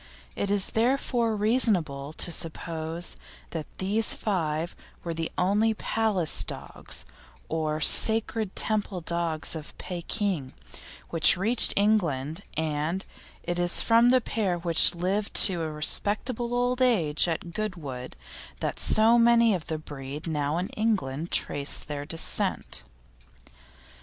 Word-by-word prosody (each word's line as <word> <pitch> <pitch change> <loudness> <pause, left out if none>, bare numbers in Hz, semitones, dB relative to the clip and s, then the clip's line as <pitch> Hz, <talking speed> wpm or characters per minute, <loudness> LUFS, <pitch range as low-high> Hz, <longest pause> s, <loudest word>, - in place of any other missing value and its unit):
It 200 - -4
is 200 -1 +3
therefore 235 -1 -1
reasonable 195 - -1
to 170 - -3
suppose 165 +1 -5 0.3
that 160 -2 -7
these 210 +4 +1
five 165 -5 -4 0.3
were 170 - -5
the 165 0 -6
only 210 +4 0
Palace 215 -7 0
dogs, - - -3 0.4
or 155 -1 -3
Sacred 220 +3 +8
Temple 210 -4 -1
dogs 165 -1 -3
of 155 -2 -10
Pekin, 180 - -5 0.6
which 165 0 +5
reached 220 +6 +4
England, 170 -7 -1 0.2
and 160 +3 -4 0.4
it 175 0 -5
is 175 0 +4
from 230 +1 +2
the 255 0 +2
pair 200 -6 -3
which 170 0 +2
lived 190 +4 -4
to 180 -4 -1
a 160 - -4
respectable 220 - 0
old 245 +1 -2
age 175 -12 +1
at 170 +1 -6
Goodwood 160 -12 -7 0.4
that - - -5
so 225 +2 +3
many 235 -1 +3
of 175 -4 -6
the 160 - -4
breed 145 0 -10
now 150 -1 -3
in 180 +2 -4
England 175 -9 -3
trace 140 0 +1
their 145 -1 -8
descent. 165 - -4
175 Hz, 125 wpm, -24 LUFS, 155-215 Hz, 0.6 s, Sacred